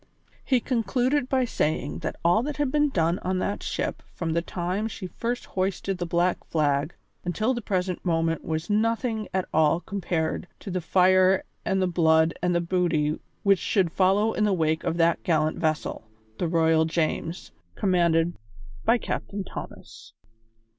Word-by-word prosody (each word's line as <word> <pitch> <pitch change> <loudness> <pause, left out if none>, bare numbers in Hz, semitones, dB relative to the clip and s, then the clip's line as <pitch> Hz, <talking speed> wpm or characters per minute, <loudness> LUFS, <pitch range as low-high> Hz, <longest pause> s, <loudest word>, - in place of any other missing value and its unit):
He 255 -3 +2
concluded 250 +3 0
by 260 -1 +2
saying 150 - -1
that - - -4
all 175 +6 +5
that 290 +3 -4
had 290 -3 0
been 295 0 +3
done 170 -6 +1
on 185 0 -1
that 200 +2 -2
ship - - -3
from 165 -2 -2
the 170 - +1
time 180 +5 -2
she 215 -3 -7
first 240 +6 -3
hoisted 190 0 -2
the 175 - -2
black 175 +1 +1
flag 145 0 0 0.3
until 215 +8 0
the 240 - -3
present 185 -3 -2
moment 165 -2 0
was 160 +1 -3
nothing 220 +1 0
at 185 0 0
all 160 +1 +4
compared 175 -4 -2
to 195 - -6
the 185 0 -1
fire 185 +2 +4 0.2
and 190 0 +1
the - - +2
blood 160 -2 +3
and 180 0 +1
the 170 - +2
booty 170 -4 0 0.2
which 195 -2 +4
should 185 -3 +1
follow 195 +5 +3
in 215 - 0
the 210 -2 +3
wake 160 -2 +1
of 165 - -1
that 170 0 +3
gallant 155 -2 +1
vessel, 155 -8 -2 0.3
the 175 - 0
Royal 160 -1 +3
James, 165 +1 -2 0.2
commanded 175 -3 +2 0.5
by 240 - +4
Captain 200 -3 -4
Thomas. 110 - -10
180 Hz, 165 wpm, -26 LUFS, 165-205 Hz, 0.5 s, all